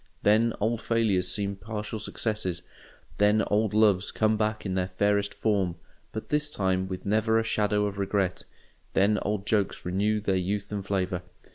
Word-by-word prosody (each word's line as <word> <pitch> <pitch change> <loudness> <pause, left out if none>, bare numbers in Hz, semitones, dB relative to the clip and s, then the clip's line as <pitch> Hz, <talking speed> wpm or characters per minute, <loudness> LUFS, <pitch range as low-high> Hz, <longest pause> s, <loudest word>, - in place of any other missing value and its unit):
Then 110 +2 +4
old 115 +2 0
failures 110 -6 +1
seem 100 0 -1
partial 105 +2 -5
successes, 105 -5 -2 0.6
then 105 +1 +4
old 105 0 +2
loves 105 -3 +3
come 110 0 +2
back 110 0 -1
in 95 - -1
their 90 -1 0
fairest 100 +2 +1
form, 100 -6 0 0.4
but 110 - -6
this 150 0 +1
time 95 -7 0
with 95 -1 -6
never 110 +2 +2
a 115 - +2
shadow 105 -2 +1
of 100 -1 -4
regret, 100 -2 0 0.5
then 100 +2 +3
old 105 -1 -2
jokes 105 -4 0
renew 100 +4 +1
their 100 -2 0
youth 100 +3 -2
and 100 -1 -3
flavour. 95 -2 -1
105 Hz, 165 wpm, -27 LUFS, 95-110 Hz, 0.6 s, Then